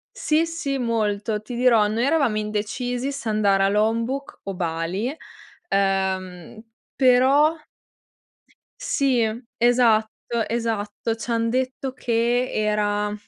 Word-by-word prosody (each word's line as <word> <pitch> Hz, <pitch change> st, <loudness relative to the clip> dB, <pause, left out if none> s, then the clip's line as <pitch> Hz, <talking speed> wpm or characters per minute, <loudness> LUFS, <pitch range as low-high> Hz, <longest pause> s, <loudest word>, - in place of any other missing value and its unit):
Sì, 315 Hz, +2 st, +1 dB
sì 330 Hz, -5 st, -3 dB
molto, 215 Hz, -3 st, -1 dB
ti 240 Hz, +3 st, -8 dB
dirò, 235 Hz, -4 st, +4 dB
noi 220 Hz, +3 st, -1 dB
eravamo 280 Hz, -7 st, +2 dB
indecisi 240 Hz, +5 st, -2 dB
se 275 Hz, -5 st, -5 dB
andare 200 Hz, -2 st, +2 dB
a 195 Hz, -, +4 dB
Lombok 230 Hz, +6 st, -1 dB
o 195 Hz, -1 st, -4 dB
Bali, 180 Hz, -, -2 dB, 0.5 s
ehm, 190 Hz, -1 st, -1 dB, 0.4 s
però 270 Hz, +4 st, +4 dB, 1.3 s
Sì, 260 Hz, -4 st, +1 dB, 0.4 s
esatto, 235 Hz, -1 st, +2 dB
esatto 225 Hz, -1 st, -2 dB
ci 230 Hz, +1 st, -7 dB
han 230 Hz, 0 st, +1 dB
detto 260 Hz, +1 st, -2 dB
che 240 Hz, 0 st, 0 dB
era, 210 Hz, -1 st, 0 dB
230 Hz, 110 wpm, -23 LUFS, 210-255 Hz, 1.3 s, dirò